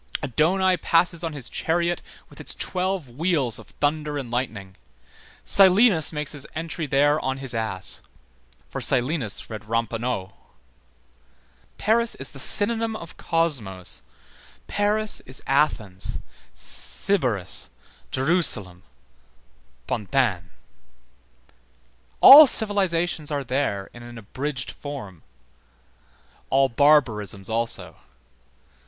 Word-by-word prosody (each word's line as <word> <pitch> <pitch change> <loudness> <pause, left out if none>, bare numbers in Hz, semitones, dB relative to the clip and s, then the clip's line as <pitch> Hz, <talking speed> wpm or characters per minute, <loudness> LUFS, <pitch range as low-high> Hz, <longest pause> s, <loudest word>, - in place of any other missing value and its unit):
Adonaï 180 +8 +1
passes 170 0 +1
on 165 -2 -3
his 140 -5 -7
chariot 170 +1 -1 0.3
with - - -13
its - - -4
twelve 185 -4 -2
wheels 140 -2 -1
of - - -14
thunder 150 0 -1
and 130 -4 -6
lightning; 110 -6 -4 0.7
Silenus 190 -3 +5
makes 150 -2 -4
his 145 -3 -7
entry 160 0 -4
there 145 +2 +2
on 130 -2 -3
his 135 -2 -4
ass. 110 -5 -3 0.7
For - - -6
Silenus 125 -3 0
read 110 -2 -8
Ramponneau. 115 -3 -3 1.4
Paris 230 +2 +1
is 135 - -4
the 135 - -9
synonym 225 - +4
of 170 -5 -10
Cosmos, 125 - -1 0.6
Paris 210 +1 0
is 130 +1 -6
Athens, 110 -10 -1 0.4
Sybaris, 125 - -2 0.4
Jerusalem, 130 - 0 1.0
Pantin. 100 - -1 1.7
All 290 +2 +11
civilizations 175 - +2
are 145 -2 -2
there 125 -7 -2
in 120 - -12
an 120 0 -11
abridged 130 +6 -5
form, 115 - -9 1.3
all 135 0 +3
barbarisms 115 -8 +2
also. 110 -7 -2
140 Hz, 100 wpm, -23 LUFS, 115-170 Hz, 1.7 s, All